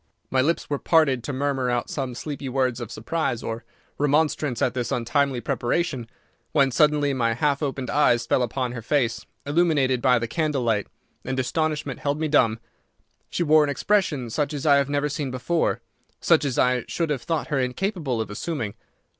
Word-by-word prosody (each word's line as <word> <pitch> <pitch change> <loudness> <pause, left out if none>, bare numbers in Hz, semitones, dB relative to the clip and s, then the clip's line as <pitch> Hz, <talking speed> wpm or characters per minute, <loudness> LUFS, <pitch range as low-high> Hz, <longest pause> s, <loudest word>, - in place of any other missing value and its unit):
My 130 - +3
lips 165 +6 0
were 145 -1 -2
parted 140 -7 +3
to - - -3
murmur 135 -1 -1
out 120 -1 0
some 130 -4 -4
sleepy 140 0 -5
words 130 -2 0
of 120 - -6
surprise 120 0 -2
or 115 0 -4 0.4
remonstrance 145 -3 +1
at 125 - +1
this 125 -2 -3
untimely 130 +1 0
preparation, 120 +1 -1 0.4
when 140 -3 +4
suddenly 150 0 +3
my 115 -3 +1
half 140 +3 +1
opened 135 -4 -2
eyes 120 -5 +3
fell 125 - +2
upon 125 +1 -1
her 120 -2 -6
face, 115 -3 0 0.2
illuminated 145 -5 +2
by 125 -1 +4
the 115 0 -2
candle 150 0 -1
light, 110 -4 +1 0.4
and 130 0 -2
astonishment 150 +1 -1
held 145 +1 -1
me 160 - 0
dumb. 120 -7 +3 0.7
She 175 - -1
wore 155 -1 +5
an 145 - 0
expression 145 - 0
such 150 +3 -1
as 145 +2 -5
I 145 -2 +6
had 140 0 +1
never 145 0 +1
seen 145 -1 -3
before—such 145 +2 -1
as 135 -3 -2
I 125 -1 +2
should 165 -3 -1
have 135 -4 -1
thought 165 -1 -2
her 145 -3 +1
incapable 135 - -1
of 110 - -5
assuming. 115 -2 -3
135 Hz, 180 wpm, -24 LUFS, 125-150 Hz, 0.7 s, I